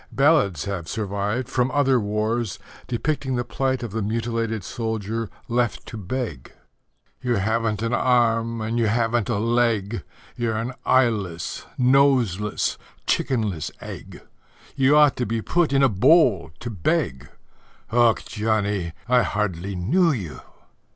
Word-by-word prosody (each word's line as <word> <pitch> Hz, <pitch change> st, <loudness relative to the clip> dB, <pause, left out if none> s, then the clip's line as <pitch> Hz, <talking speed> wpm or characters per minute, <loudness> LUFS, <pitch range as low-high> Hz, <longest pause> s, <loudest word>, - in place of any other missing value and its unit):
Ballads 135 Hz, -, +3 dB
have 90 Hz, -5 st, -4 dB
survived 105 Hz, +3 st, -2 dB
from 125 Hz, 0 st, +1 dB
other 135 Hz, -2 st, +3 dB
wars, 110 Hz, 0 st, -1 dB, 0.3 s
depicting 135 Hz, +2 st, -1 dB
the 120 Hz, -, 0 dB
plight 130 Hz, +1 st, -1 dB
of 115 Hz, -, -5 dB
the 110 Hz, +2 st, -2 dB
mutilated 115 Hz, 0 st, -2 dB
soldier 110 Hz, +1 st, -3 dB, 0.2 s
left 120 Hz, -1 st, -1 dB
to -, -, -9 dB
beg: 110 Hz, -, -5 dB, 0.7 s
You 125 Hz, -1 st, 0 dB
haven't 110 Hz, +1 st, 0 dB
an 115 Hz, +1 st, -1 dB
arm 115 Hz, -2 st, +2 dB
and 115 Hz, +2 st, -1 dB
you 115 Hz, -, +2 dB
haven't 115 Hz, +1 st, +1 dB
a 115 Hz, -, +1 dB
leg, 115 Hz, -2 st, +1 dB, 0.3 s
You're 115 Hz, -2 st, -1 dB
an 115 Hz, +3 st, -3 dB
eyeless, 105 Hz, -10 st, +1 dB
noseless, 125 Hz, -6 st, +2 dB, 0.3 s
chickenless 105 Hz, -, 0 dB
egg, -, -, -9 dB, 0.5 s
You 140 Hz, +2 st, +4 dB
ought 150 Hz, -2 st, +6 dB
to 125 Hz, -, -1 dB
be 115 Hz, +2 st, -1 dB
put 170 Hz, +7 st, +1 dB
in 135 Hz, 0 st, +3 dB
a -, -, +7 dB
bowl 125 Hz, -, +4 dB
to 120 Hz, 0 st, -4 dB
beg 65 Hz, -, -1 dB, 0.6 s
Och, 120 Hz, -1 st, +3 dB
Johnnie, 105 Hz, -5 st, 0 dB
I 125 Hz, 0 st, +4 dB
hardly 100 Hz, -3 st, -2 dB
knew 160 Hz, -, +2 dB
you! 95 Hz, -, -5 dB
115 Hz, 135 wpm, -23 LUFS, 105-125 Hz, 0.7 s, a